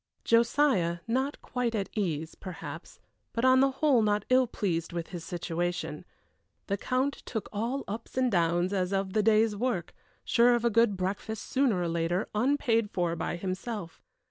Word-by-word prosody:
Josiah, 230 -7 +3
not 265 +5 -1
quite 245 -3 -2
at 200 -2 -1
ease, 165 -6 -2
perhaps, 185 -2 -8 0.3
but 230 +2 0
on 260 0 +6
the 270 +1 +5
whole 270 -2 +3
not 210 -1 +1
ill 255 0 +5
pleased 175 -7 -2
with 170 -1 -4
his 175 -3 -6
situation. 175 -1 -3 0.6
The 200 - -1
Count 255 +6 -1
took 220 -3 -4
all 235 +6 -2
ups 225 +5 -7
and 255 -1 +2
downs 175 +1 +2
as 185 -1 0
of 195 -1 -1
the 215 - +3
day's 215 0 +3
work, 205 -6 -2 0.3
sure 240 +1 +5
of 240 0 -1
a 235 - +3
good 225 -2 +3
breakfast, 200 +4 -3
sooner 260 -8 +1
or 175 - 0
later, 170 +3 0
unpaid 230 -2 +2
for 175 -3 -1
by 170 - -3
himself. 185 0 -5
210 Hz, 170 wpm, -29 LUFS, 175-240 Hz, 0.6 s, on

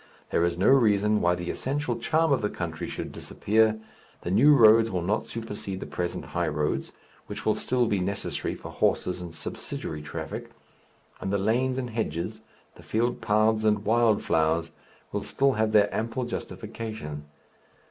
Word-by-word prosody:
There 85 - +2
is 85 0 0
no 95 - +3
reason 105 -5 +4
why 90 0 +3
the 85 0 -3
essential 145 +3 -2
charm 160 -1 +2
of 135 - +1
the 105 - 0
country 80 -3 -4
should - - -5
disappear; 110 +1 +1 0.4
the 85 - -3
new 140 +10 +6
roads 115 -2 +7
will 90 -4 -2
not 105 +5 0
supersede 105 -4 -5
the - - -6
present 85 -1 -3
high 90 -1 0
roads, 75 -1 -1 0.4
which 105 +1 -7
will 110 - +4
still 125 +3 +1
be 105 -3 +1
necessary 100 +2 -2
for - - -9
horses 90 0 0
and 85 -1 -7
subsidiary 80 -1 -6
traffic; 75 - -6 0.7
and 95 - -3
the 100 - +2
lanes 125 +6 +1
and 125 -2 -3
hedges, 110 0 -3 0.4
the - - -13
field 120 +3 -1
paths 110 +1 +2
and 105 -1 +2
wild 115 -1 +3
flowers, 80 +1 +1 0.4
will - - -2
still 135 0 +2
have 110 -3 +1
their 105 -1 +5
ample 115 +3 -2
justification. 110 -10 -6
105 Hz, 170 wpm, -27 LUFS, 90-115 Hz, 0.7 s, roads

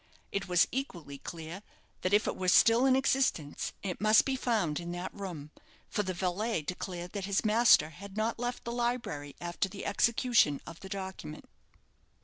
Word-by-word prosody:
It 200 -1 -2
was 180 -1 +4
equally 170 - -5
clear 165 +4 -7 0.4
that 185 - 0
if 205 +1 +4
it - - -1
were 185 - -3
still 230 +7 +6
in 260 - +5
existence, 265 - 0
it 190 -2 -4
must 215 0 +6
be 270 - 0
found 215 - 0
in 175 0 -5
that 175 +1 -5
room, 170 -8 -7 0.4
for - - +1
the 185 -2 -3
valet 190 +1 -1
declared 180 +1 -5
that 200 -2 -4
his 200 +2 0
master 215 -8 +5
had 200 +5 -11
not 225 +1 0
left 245 0 -3
the 235 - -4
library 235 - -2
after 175 +2 -2
the 200 +1 -8
execution 235 - +3
of 165 0 -10
the 190 - -10
document. 190 -6 -6
195 Hz, 175 wpm, -31 LUFS, 175-230 Hz, 0.4 s, still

